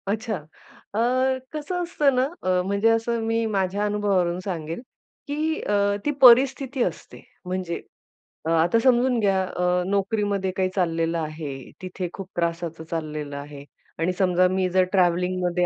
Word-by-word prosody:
अच्छा, 220 +2 -1
अ, 160 +5 -10 0.5
कसं 350 +4 -3
असतं 295 -6 +1
ना, 255 - +3 0.2
अ, 185 -1 +2
म्हणजे 200 +3 +2
असं 225 +1 +1
मी 225 0 0
माझ्या 200 -1 0
अनुभवावरून 195 -4 +1
सांगेल, 165 -1 -4 0.5
की 310 +2 -1
अ, 200 0 +1
ती 295 - +2
परिस्थिती 260 +1 +6
असते - - -5 0.2
म्हणजे, 180 -2 -3 0.6
अ, - - -1
आता 165 +7 +3
समजून 250 -1 +3
घ्या 195 -3 +2
अ, 180 -1 0
नोकरीमध्ये 200 -1 0
काय 185 -1 +1
चाललेलं 165 -2 0
आहे, 155 -4 -6
तिथे 185 -1 -5
खूप 195 -2 -7
त्रासाचं 170 -1 -2
चाललेलं 150 -3 -4
आहे 140 0 -9 0.4
आणि 170 +3 +1
समजा 185 -1 +4
मी 185 0 0
जर 185 +1 +3
ट्रॅव्हलिंगमध्ये 180 -1 +2
185 Hz, 140 wpm, -24 LUFS, 170-225 Hz, 0.6 s, परिस्थिती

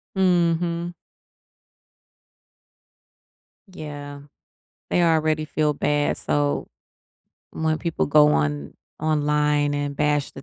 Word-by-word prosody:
Mhm. 175 -2 +1 2.8
Yeah. 145 -3 -8 0.7
They 175 - +2
already 155 -2 +2
feel 150 0 0
bad, 145 +1 0
so 145 -1 -1 0.8
when 160 0 -1
people 165 -2 -1
go 150 +1 +6
on 75 -1 -1 0.3
online, 150 -1 +1
and 145 -1 -3
bash 150 -1 +1
the 135 - -10
150 Hz, 85 wpm, -23 LUFS, 145-160 Hz, 2.8 s, go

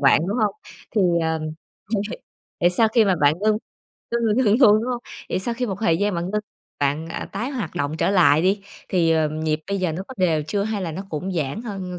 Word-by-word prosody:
bạn, 140 +2 +5
đúng 220 +5 -1
hông? 205 -1 +1 0.4
Thì, 210 - +3 0.2
ờ, 160 0 0 0.6
mình 200 - +1
hiểu. - - -7 0.4
Vậy 175 +1 +4
sau 220 +5 +3
khi 225 0 +4
mà 190 -2 +3
bạn 145 +1 +5
ngưng 215 0 +3 0.5
ngưng 235 0 0
là 215 -1 +3
ngưng 210 +1 +4
luôn, 210 -2 +8
đúng - - -3
hông? 240 0 -4 0.3
Vậy - - 0
sau 235 +5 -2
khi 250 +1 -2
một 195 - -3
thời 165 -7 +3
gian 205 -1 +1
bạn 175 +2 -2
ngưng 210 0 0 0.4
bạn, 145 +3 0
à, - - -5
tái 235 +7 -3
hoạt 250 -10 -4
động 145 -1 -2
trở 190 - +1
lại 170 -5 +5
đi, 195 +2 +2 0.3
thì, 170 -3 +2
ờ, 160 -1 +2
nhịp 155 0 -1
bây 200 0 -1
giờ 180 -4 0
nó 180 +4 -4
có 260 - -8
đều 165 -5 +2
chưa 200 +7 -1
hay 210 -2 -2
là 165 -3 -3
nó 190 - -5
cũng 180 +5 -3
giãn 160 - -2
hơn, 190 -5 -5
190 Hz, 250 wpm, -23 LUFS, 160-210 Hz, 0.6 s, luôn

